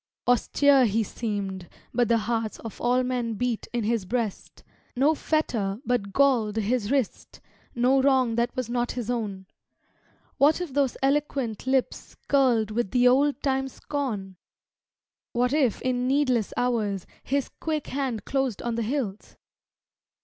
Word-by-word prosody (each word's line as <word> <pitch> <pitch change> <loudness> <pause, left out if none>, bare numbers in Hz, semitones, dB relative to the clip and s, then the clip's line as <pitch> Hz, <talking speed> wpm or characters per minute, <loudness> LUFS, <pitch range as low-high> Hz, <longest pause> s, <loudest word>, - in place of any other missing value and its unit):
Austere 265 +2 +4
he 220 +2 +1
seemed, 200 -4 -4 0.2
but 240 0 +2
the 230 - +3
hearts 225 0 -2
Of 225 - -8
all 250 +1 +2
men 245 -3 -2
beat 240 0 -2
in 240 -2 -1
his 220 -2 0
breast; 225 0 -4 0.3
No 280 +5 +4
fetter 230 -11 -1
but 235 -5 0
galled 240 -5 +3
his 220 0 0
wrist, 270 -5 -2 0.4
No 255 +3 +3
wrong 260 -3 +3
that 235 +2 0
was 255 -3 -2
not 240 0 -1
his 245 -1 -3
own. 205 -5 -3 0.9
What 295 +4 +5
if 350 -7 -5
those 275 -3 +1
eloquent 270 -5 0
lips 265 -1 -1
Curled 245 -6 +3
with 225 -2 -1
the 250 +2 +4
old 280 +3 +3
time 270 -1 +1
scorn? 225 -9 -4 1.0
What 250 +1 +1
if 270 -8 +1
in 250 -1 0
needless 255 -5 +1
hours 215 -6 0 0.2
His 280 0 -1
quick 310 -2 -2
hand 260 -5 -3
closed 270 -5 -1
on 240 - -1
the 230 - -1
hilt? 225 -4 -3
245 Hz, 145 wpm, -26 LUFS, 220-270 Hz, 1.0 s, What